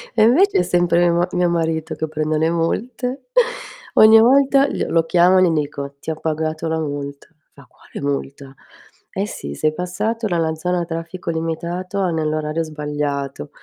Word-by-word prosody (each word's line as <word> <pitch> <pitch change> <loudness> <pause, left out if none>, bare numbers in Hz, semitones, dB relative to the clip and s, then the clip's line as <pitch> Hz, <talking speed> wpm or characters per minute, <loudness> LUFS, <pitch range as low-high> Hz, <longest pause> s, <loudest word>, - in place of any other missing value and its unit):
E - - +5
invece 335 - +4
è - - +4
sempre 175 -1 +2
mio 175 -1 +3
ma 175 +1 +1
mio 180 -1 +1
marito 165 -2 -1
che 160 - -3
prende 155 0 -1
le 160 +1 +2
multe. 215 +10 -2 0.9
Ogni 220 +1 +8
volta 275 +3 +5
gl - - -3
lo 165 -1 +2
chiamo 180 +2 +4
e - - +4
li 175 - +3
dico: 140 -2 -3
"Ti 160 - -4
ho 160 - -3
pagato 160 0 -2
la 160 0 -1
multa." 145 -2 -5 0.3
Fa: 140 -2 -17
"Quale - - -10
multa?" 140 -1 -4 0.6
"Eh 195 - -2
sì, 70 - -7
sei 155 - 0
passato 215 +6 -2
dalla 165 -4 0
zona 180 +2 -1
a - - -3
traffico 165 +1 -5
limitato 170 +4 -4
a 185 -3 +1
nell'orario 155 0 -1
sbagliato." 145 - -4
165 Hz, 175 wpm, -20 LUFS, 155-180 Hz, 0.9 s, Ogni